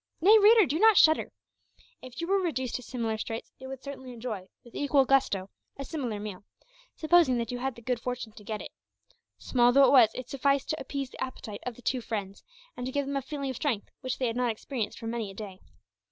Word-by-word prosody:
Nay, 410 +6 +7
reader, 430 0 +7
do 310 +1 -1
not 440 -1 +6
shudder! 315 0 +5 0.7
If 255 +4 -9
you - - -1
were 390 +3 +2
reduced 260 -9 -2
to - - -2
similar 230 -3 -3
straits, 225 +1 -5
you 260 - -9
would 265 0 -8
certainly 265 -3 -8
enjoy, 225 -6 -6 0.2
with 235 - -17
equal 280 -1 +2
gusto, 200 -8 +1 0.3
a 275 - -5
similar 250 -9 -4
meal, 205 -2 -7 0.5
supposing 315 -5 +4
that 235 +1 -2
you 245 - -4
had 265 -1 -2
the 235 - -14
good 250 0 -1
fortune 245 -2 -4
to 210 0 -14
get 215 0 -5
it. - - -9 0.7
Small 245 -1 +3
though 275 +2 +6
it - - +4
was, 250 -6 +7
it 255 -1 -6
sufficed 275 +1 0
to 310 - -2
appease 275 -1 -4
the - - -5
appetite 225 -5 -7
of 245 - -4
the 245 - -16
two 255 +2 0
friends, 200 -4 -5 0.3
and 245 - -5
to - - -3
give 285 +1 -1
them 280 +1 -3
a 275 - 0
feeling 275 0 -4
of 255 - -7
strength 240 -9 -2
which 255 -2 -3
they 260 - -1
had 230 -1 -1
not 250 -1 +1
experienced 225 0 -4
for - - -9
many 225 -2 -3
a 195 - -11
day. 195 -3 -8
255 Hz, 235 wpm, -28 LUFS, 225-275 Hz, 0.7 s, Nay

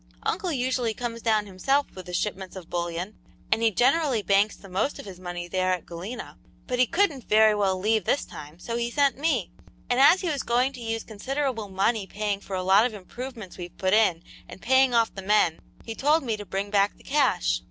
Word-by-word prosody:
"Uncle 360 - -1
usually 250 -4 -1
comes 235 -1 -5
down 215 -2 +2
himself 270 +9 +1
with 185 -1 -10
the 180 - -7
shipments 190 -1 -3
of 180 -3 -10
bullion, 175 +3 -3 0.4
and 225 - +3
he 230 - +4
generally 255 - +2
banks 200 +2 +3
the 195 - -14
most 190 +9 -1
of - - -9
his 190 -3 -10
money 175 -1 -6
there 185 +1 +1
at 180 - -4
Galena, 190 +9 -8 0.3
but 250 -1 -2
he 255 - +5
couldn't 330 - 0
very 215 0 +6
well 195 -2 +1
leave 215 +1 +1
this 280 - 0
time, 150 +2 -11
so 230 +6 -4
he 235 0 -1
sent 280 +2 +2
me, 275 - 0 0.4
and 245 - +2
as 290 +7 +7
he 365 - -2
was 285 -4 -1
going 250 +3 +1
to 250 - -10
use 225 -1 -3
considerable 245 0 -3
money 195 +2 0
paying 205 -1 -2
for 200 -1 -6
a 185 - -2
lot 190 +3 +5
of 235 -3 -1
improvements 220 0 -8
we've 175 0 -8
put 190 0 +1
in 185 -6 +3 0.3
and - - -10
paying 260 +1 +3
off 230 -1 +3
the 195 - -7
men, 190 -5 +2 0.3
he 225 - -5
told 295 +6 +2
me 230 -4 -1
to 205 -1 -9
bring 195 +1 -3
back 200 0 +2
the - - -20
cash. 260 - +1
215 Hz, 220 wpm, -26 LUFS, 190-255 Hz, 0.4 s, as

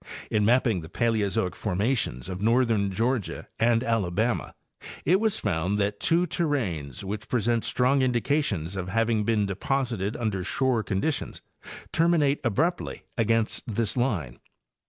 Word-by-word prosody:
In 105 -1 +2
mapping 115 -4 +3
the 80 - -10
Paleozoic 100 -4 0
formations 100 - -1
of 95 0 -5
northern 115 -3 +2
Georgia 115 +2 -1
and 115 +1 +3
Alabama 115 0 0 0.5
it 180 +6 +4
was 220 -1 +1
found 95 0 0
that 100 0 -1
two 170 +2 +3
terranes 110 - -2
which 105 +2 -5
present 120 -1 +1
strong 130 +2 +2
indications 120 - 0
of 95 -1 -4
having 115 +1 +1
been 110 -2 +2
deposited 110 +1 -1
under 105 -6 -2
shore 125 +5 +1
conditions 105 +10 -2 0.5
terminate 160 -4 +3
abruptly 160 - -1
against 115 -1 +1
this 110 -1 -1
line. 100 - -1
115 Hz, 130 wpm, -26 LUFS, 100-130 Hz, 0.5 s, it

